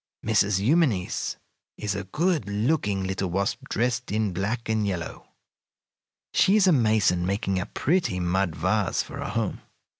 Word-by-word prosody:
"Mrs. 105 -3 +3
Eumenes 120 - +1 0.4
is 105 -2 -2
a 100 -2 -4
good 155 - 0
looking 105 -2 0
little 95 0 -2
wasp 100 +9 -2
dressed 125 0 -1
in 105 -2 0
black 110 +6 -2
and 110 -2 0
yellow. 90 -4 -5 1.1
She 195 - +4
is 210 -3 +5
a 185 - +5
mason, 110 - +3
making 95 0 -1
a 90 - -4
pretty 160 - 0
mud 90 -1 0
vase - - 0
for - - -9
a - - -4
home. - - -2
105 Hz, 150 wpm, -26 LUFS, 95-125 Hz, 1.1 s, is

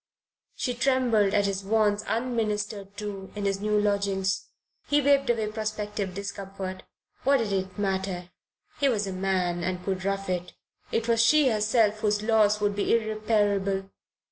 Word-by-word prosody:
She 250 - -1
trembled 240 -5 +2
at 205 -1 +3
his 195 0 -2
wants 210 0 +2
unministered 210 -4 -2
to 200 -2 -6
in 205 -1 -3
his 195 0 0
new 210 0 +2
lodgings. 200 -2 0 0.4
He 290 - +3
waved 280 -2 +3
away 230 -2 +2
prospective 210 -3 -3
discomfort: 195 -1 -6 0.4
what 275 +1 +4
did 220 -5 -1
it 190 -1 -2
matter? 190 -3 -2 0.5
He 280 - +3
was 210 -5 0
a 195 - -4
man 185 -2 0
and 180 0 -3
could 190 -1 -2
rough 195 0 -1
it. 180 -1 -3 0.4
It 230 0 0
was 230 -1 +3
she 295 +2 +5
herself 215 -1 +2
whose 210 -1 +1
loss 215 -2 +3
would 205 -1 0
be 205 - +2
irreparable. 205 -3 0
205 Hz, 155 wpm, -27 LUFS, 195-220 Hz, 0.5 s, she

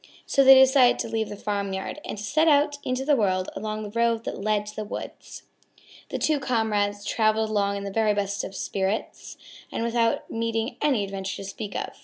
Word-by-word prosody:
So 275 - +3
they 270 0 +10
decided 265 -1 +6
to - - -3
leave 220 -1 -2
the - - -6
farmyard 200 +4 -3
and 350 - -6
to 205 - -6
set 310 +8 +2
out 290 -1 +3
into 255 +1 -2
the 295 0 +4
world 185 -5 0
along 215 0 -4
the 205 - -7
road 230 0 +1
that - - -5
led 210 0 0
to 210 - -9
the 215 - -3
woods. 210 - -8 0.7
The - - -3
two 305 -2 +1
comrades 210 -5 0
traveled 220 -1 +1
along 200 -1 +1
in 200 - -5
the 200 - -5
very 215 0 +2
best 200 0 -2
of 195 - -7
spirits 195 +2 -3 0.3
and - - -2
without 230 0 0
meeting 230 +1 -2
any 265 -8 +2
adventure 195 -1 -4
to - - -7
speak 195 +1 -7
of. - - -4
215 Hz, 205 wpm, -25 LUFS, 205-245 Hz, 0.7 s, they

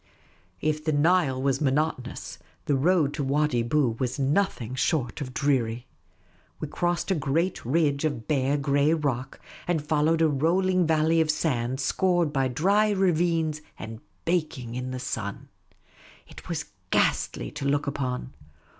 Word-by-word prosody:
If 155 0 0
the 155 - +1
Nile 150 -3 +3
was 135 +1 0
monotonous, 140 -2 -1 0.3
the 145 - +1
road 150 0 +2
to 145 - -2
Wadi 140 -2 +1
Bou 120 -1 +1
was 130 +1 -1
nothing 140 - 0
short 135 -1 -1
of 130 -3 -4
dreary. 125 -4 0 0.7
We - - -4
crossed 175 +2 -1
a - - +5
great 160 +3 0
ridge 145 +2 +1
of 140 -8 -2
bare, 140 -1 +1
grey 145 +2 +2
rock, 135 -4 -3 0.3
and 175 -2 +1
followed 155 +2 +2
a - - +5
rolling 175 +5 +2
valley 160 +1 +3
of 160 - 0
sand, 130 -5 0
scored 175 0 +1
by 135 -2 +2
dry 200 - +2
ravines, 170 -5 +1 0.2
and 110 0 -7 0.3
baking 155 -9 -1
in 125 +1 -4
the 130 - -4
sun. 110 -5 -5 0.8
It - - -13
was - - -2 0.2
ghastly - - +1
to 140 - -6
look 145 +1 +1
upon. 130 -2 -3
145 Hz, 145 wpm, -26 LUFS, 130-165 Hz, 0.8 s, a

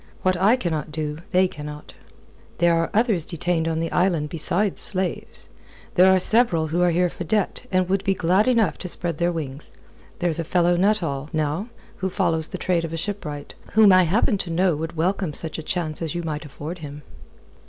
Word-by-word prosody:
What 185 0 +2
I 195 +7 +4
cannot 160 - -3
do, 150 0 -4
they 185 0 +4
cannot." 150 -2 -9 0.6
"There 170 0 +3
are 165 0 +1
others 215 -6 +2
detained 165 0 -1
on 160 -1 -1
the 165 0 -2
island 170 -5 +1
besides 175 +5 -1
slaves. 185 -3 -1 0.4
There 185 +1 +6
are 190 - +4
several 185 -5 +4
who 170 +3 0
are 180 - +4
here 175 +1 +2
for 175 - -6
debt, 210 +6 -1
and 185 -1 +2
would 195 +1 0
be 195 -1 +1
glad 185 +5 +2
enough 230 -5 +2
to 180 - -5
spread 170 -2 -2
their 175 0 +2
wings. 150 -4 -6 0.4
There's 175 -3 0
a - - 0
fellow 175 +1 +2
Nuttall, 175 -7 0
now, 155 +6 -1 0.3
who 190 - -2
follows 160 -3 +1
the - - -6
trade 175 -2 0
of 165 -1 -5
a - - -2
shipwright, 160 -6 -5 0.2
whom 215 -3 +7
I 185 - +7
happen 205 +4 +1
to 180 - -1
know 175 0 +2
would 160 +2 -5
welcome 180 0 0
such 160 -1 -5
a - - -4
chance 155 -1 -2
as 165 0 -3
you 175 - -2
might 155 -2 -4
afford 150 +5 -7
him." 145 -1 -9
175 Hz, 200 wpm, -23 LUFS, 160-185 Hz, 0.6 s, whom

